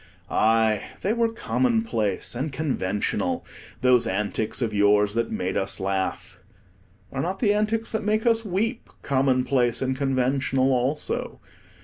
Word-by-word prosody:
Aye, 110 -1 +3 0.2
they 205 - +1
were 230 -1 +1
commonplace 225 - 0
and 135 +5 -3
conventional, 125 -9 -1 0.4
those 125 -1 +4
antics 105 +2 -1
of 115 -4 -1
yours 105 0 +3
that 115 +1 0
made 90 +1 -2
us 95 0 -1
laugh; 95 0 -3 0.7
are 135 - -2
not 185 +5 -2
the 205 -2 +2
antics 215 +2 0
that 220 -1 -2
make 215 +2 0
us 225 -1 +3
weep 220 +5 -2
commonplace 130 -2 +2
and 130 0 -1
conventional 135 0 +1
also? 130 +4 -1
130 Hz, 130 wpm, -25 LUFS, -, 0.7 s, those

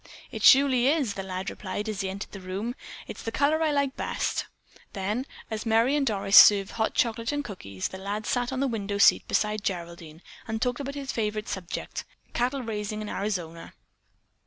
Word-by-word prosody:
"It - - -6
surely 265 -2 +6
is!" 280 -7 +2
the 195 - -5
lad 190 0 -4
replied 205 +2 -5
as 210 -2 -2
he 190 - -2
entered 195 +2 -6
the 195 - -8
room. 195 +6 -4 0.3
"It's - - -8
the 225 - -4
color 295 +5 +2
I 320 - +3
like 280 -2 0
best." - - -2 0.5
Then, 210 +7 -2 0.2
as 215 -1 -3
Merry 230 +4 +3
and 285 -2 +1
Doris 200 -2 +1
served 200 -2 +8
hot 220 -1 -1
chocolate 230 +1 0
and 290 0 -2
cookies, 100 - -5
the 190 - -8
lad 205 +2 -4
sat 245 0 0
on 265 0 -2
the 275 - +2
window 205 -4 -3
seat 200 - +5
beside 210 -1 0
Geraldine 170 -3 -5 0.2
and 220 0 -2
talked 250 +1 -1
about 280 0 -5
his 275 -1 -4
favorite 215 -1 -2
subject, 180 -3 -5 0.3
cattle 255 +2 0
raising 215 -1 -4
in 210 - -6
Arizona. 175 -5 -4
215 Hz, 190 wpm, -27 LUFS, 195-250 Hz, 0.5 s, served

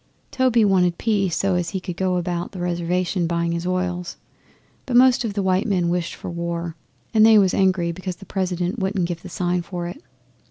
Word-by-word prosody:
Toby 250 -4 +3
wanted 180 -3 +3
peace 200 -6 0
so 195 -1 +1
as 175 -1 0
he 190 - -3
could 180 -1 -6
go 185 0 0
about 175 +1 -3
the 185 - -7
Reservation 175 0 -1
buying 170 0 0
his 170 +1 -2
oils. 180 -1 -2 0.7
But 250 - -1
most 250 -1 +5
of 215 -4 -3
the 200 - 0
white 185 +2 +1
men 180 -4 +1
wished 175 0 -2
for - - -7
war, 170 -1 -4 0.4
and 215 - +5
they 220 0 +7
was 195 -3 +4
angry 185 -3 +2
because 185 +1 -5
the 195 - -13
President 185 +2 -2
wouldn't 190 -2 0
give 170 -1 -5
the 185 - -9
sign 180 0 -1
for 175 0 -5
it. 175 - -7
180 Hz, 205 wpm, -22 LUFS, 175-195 Hz, 0.7 s, they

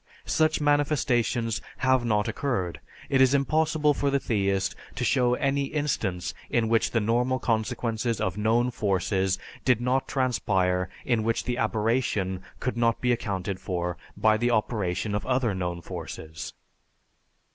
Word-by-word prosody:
Such 155 0 +2
manifestations 135 -6 +1 0.2
have 130 -1 +3
not 105 -2 +1
occurred. 115 -7 -2 0.3
It 135 -1 +3
is 130 +1 +5
impossible 150 +2 +2
for 140 0 0
the 140 0 +2
theist 100 -5 0 0.2
to - - -2
show 125 -2 +3
any 140 +1 0
instance 130 - -2 0.2
in 115 -2 +1
which 115 -1 +3
the 115 - +1
normal 120 +4 +1
consequences 115 -1 -1
of 95 -1 -1
known 115 +4 +2
forces 95 -3 0 0.3
did 125 -4 +3
not 125 +2 0
transpire 95 -8 +1 0.2
in 120 -4 +2
which 115 +1 0
the 125 0 -2
aberration 110 -4 0 0.2
could 125 -2 -2
not 115 -1 +2
be 125 - +1
accounted 100 -4 -2
for 90 -2 -2 0.2
by 110 0 +4
the 120 +2 +1
operation 105 -3 0
of 105 - -1
other 125 -4 +1
known 90 -2 -3
forces. 80 +1 -7
115 Hz, 145 wpm, -27 LUFS, 100-130 Hz, 0.3 s, is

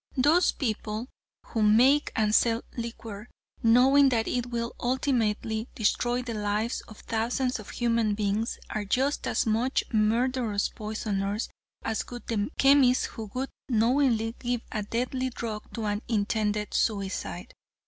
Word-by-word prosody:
Those 305 +8 +4
people 220 -1 -3 0.4
who 225 - -2
make 245 +8 +5
and 215 -1 +2
sell 230 +1 +3
liquor, 230 -2 -6 0.3
knowing 265 +4 +6
that 225 -3 0
it 245 -1 -1
will 235 -1 -3
ultimately 230 -3 0
destroy 240 +2 +1
the 240 -2 -4
lives 210 +2 -1
of 215 - -13
thousands 245 +3 -1
of 215 - -10
human 230 -3 +1
beings, 210 +2 -1
are 215 - -2
just 265 +8 0
as - - +1
much 230 +4 +1
murderous 225 0 +1
poisoners 210 -1 -3 0.3
as 225 -1 -2
would 245 -1 -8
be 230 - -2
the 205 +2 0
chemist 270 -2 +5
who 220 -3 -6
would 265 +1 -2 0.2
knowingly 230 -1 +2
give 245 -1 -1
a 215 - -2
deadly 250 +4 -2
drug 225 -3 -6
to 225 -2 -3
an 205 0 -1
intended 210 -1 0
suicide." 200 -3 -2
230 Hz, 140 wpm, -27 LUFS, 215-250 Hz, 0.4 s, knowing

